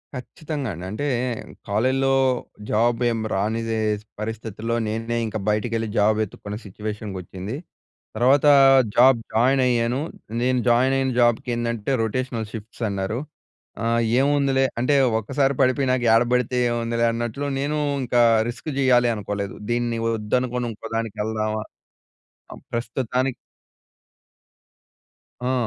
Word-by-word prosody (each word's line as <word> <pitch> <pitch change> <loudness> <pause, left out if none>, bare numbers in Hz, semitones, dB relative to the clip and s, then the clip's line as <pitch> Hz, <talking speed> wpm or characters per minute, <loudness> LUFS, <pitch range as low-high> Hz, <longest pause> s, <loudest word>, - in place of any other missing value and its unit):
ఖచ్చితంగా 145 +1 -5
అండి. 85 +2 -7
అంటే 110 +7 -3 0.6
కాలేజీలో 130 +6 +2 0.5
జాబ్ 115 +2 +2
ఏమి 115 -1 -2
రానిదే 110 +3 -1 0.4
పరిస్థితిలో 110 +1 -4
నేనే 115 +2 -2
ఇంక 110 0 -3
బయటికెళ్ళి 115 +1 0
జాబ్ 105 +1 +4
వెతుక్కున్న 105 0 -5
సిట్యుయేషన్‌కి 105 0 -6
వచ్చింది. 95 +6 -7 0.6
తర్వాత 130 +6 +4 0.5
జాబ్ 125 0 +6
జాయిన్ 130 +4 +3
అయ్యాను. 120 +1 +1 0.4
నేను 125 0 +2
జాయిన్ 130 +3 +3
అయిన 135 -1 0
జాబ్‌కేందంటే 120 -1 0
రొటేషనల్ 115 -1 -2
షిఫ్ట్స్ 110 +1 -8
అన్నారు. 100 +3 -2 0.6
ఆహ్, 115 0 +2 0.2
ఏముందిలే 140 -1 +2
అంటే 125 +4 +2 0.2
ఒక్కసారి 135 +5 0
పడిపోయనక 130 -1 +2
ఏడ 115 +1 +5
పడితే 125 0 +1
ఏముందిలే 115 0 0
అన్నట్లు 120 +4 -3
నేను 145 +2 -1 0.3
ఇంకా 120 0 +2 0.3
రిస్క్ 120 +6 -6
చేయాలి 125 -3 +4
అనుకోలేదు. 100 -1 -4
దీన్ని 120 -1 0
వద్దనుకొని 120 +3 -1
ఇంకో 110 - -9
దానికి 115 -2 -3
వెళ్దామా? 110 0 -2 0.9
ఆహ్, - - -11
ప్రస్తుతానికి 125 +2 -1 2.2
ఆ! - - +2
115 Hz, 110 wpm, -23 LUFS, 110-130 Hz, 2.2 s, జాబ్